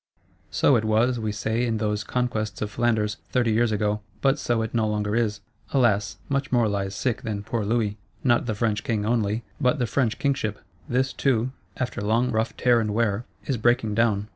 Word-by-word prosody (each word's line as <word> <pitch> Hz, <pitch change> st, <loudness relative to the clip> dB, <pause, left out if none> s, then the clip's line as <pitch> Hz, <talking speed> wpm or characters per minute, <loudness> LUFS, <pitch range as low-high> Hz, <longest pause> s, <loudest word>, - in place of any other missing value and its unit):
So 140 Hz, -, +4 dB
it 110 Hz, -, -1 dB
was, 115 Hz, +3 st, +2 dB
we 110 Hz, -1 st, -1 dB
say, 110 Hz, +3 st, -1 dB
in 115 Hz, -2 st, 0 dB
those 105 Hz, -1 st, -1 dB
conquests 110 Hz, -5 st, -2 dB
of 105 Hz, -, -4 dB
Flanders, 110 Hz, -2 st, +1 dB
thirty 120 Hz, -3 st, +2 dB
years 115 Hz, +1 st, +2 dB
ago: 105 Hz, 0 st, 0 dB, 0.2 s
but 135 Hz, +1 st, +3 dB
so 120 Hz, -2 st, 0 dB
it 110 Hz, -, -5 dB
no 110 Hz, -2 st, +2 dB
longer 105 Hz, 0 st, -1 dB
is. 105 Hz, -3 st, 0 dB, 0.3 s
Alas, 110 Hz, -7 st, +2 dB
much 140 Hz, -1 st, -1 dB
more 120 Hz, -3 st, +3 dB
lies 100 Hz, -1 st, -2 dB
sick 120 Hz, +3 st, -1 dB
than 105 Hz, -5 st, -4 dB
poor 110 Hz, +1 st, -2 dB
Louis: 105 Hz, -1 st, 0 dB, 0.3 s
not 120 Hz, -1 st, +3 dB
the 110 Hz, -, -1 dB
French 110 Hz, 0 st, 0 dB
King 110 Hz, -5 st, -1 dB
only, 110 Hz, -1 st, 0 dB, 0.2 s
but 125 Hz, +3 st, +3 dB
the 125 Hz, -, +1 dB
French 120 Hz, -1 st, 0 dB
Kingship; 120 Hz, -7 st, 0 dB, 0.3 s
this 130 Hz, +2 st, +1 dB
too, 130 Hz, -2 st, +1 dB, 0.3 s
after 125 Hz, -5 st, -3 dB
long 115 Hz, +4 st, +1 dB
rough 110 Hz, 0 st, -1 dB
tear 120 Hz, -2 st, +4 dB
and 105 Hz, -1 st, -2 dB
wear, 115 Hz, 0 st, +1 dB, 0.2 s
is 135 Hz, -, 0 dB
breaking 115 Hz, -1 st, +2 dB
down. 105 Hz, -2 st, +2 dB
110 Hz, 195 wpm, -25 LUFS, 105-120 Hz, 0.3 s, So